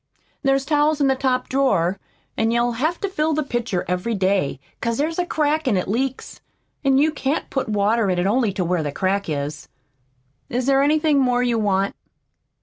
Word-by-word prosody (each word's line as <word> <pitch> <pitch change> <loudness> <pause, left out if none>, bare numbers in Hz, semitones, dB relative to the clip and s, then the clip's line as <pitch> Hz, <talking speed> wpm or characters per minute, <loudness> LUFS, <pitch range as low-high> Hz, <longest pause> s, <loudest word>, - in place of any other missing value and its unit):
There's 270 -1 +1
towels 300 +1 +2
in 285 - +3
the 265 -1 +3
top 255 -1 0
drawer, 200 -9 +1 0.4
an' 225 - +1
you'll 235 +1 +1
have 310 +9 -1
to 400 - 0
fill 315 -4 0
the 305 +1 0
pitcher 240 -8 -2
every 180 +6 -1
day, 185 -8 0 0.2
'cause 230 -1 -1
there's 320 +4 -1
a 355 - 0
crack 305 -1 0
an' 215 -6 +2
it 180 - -2
leaks, 260 +6 -3 0.4
an' 270 -1 +3
you 305 +3 +3
can't 285 0 -2
put 270 - -1
in 215 - -3
the - - -1
water 210 +1 +2 0.2
only 225 0 +2
to 185 -2 -1
where 175 -1 0
the 145 -2 -3
crack 195 +3 -1
is. 145 0 -4 0.8
Is 245 +1 -1
there 275 0 +4
anything 300 0 +3
more 250 -2 +2
you 240 -2 +1
want?" 200 -2 0
245 Hz, 195 wpm, -22 LUFS, 200-280 Hz, 0.8 s, there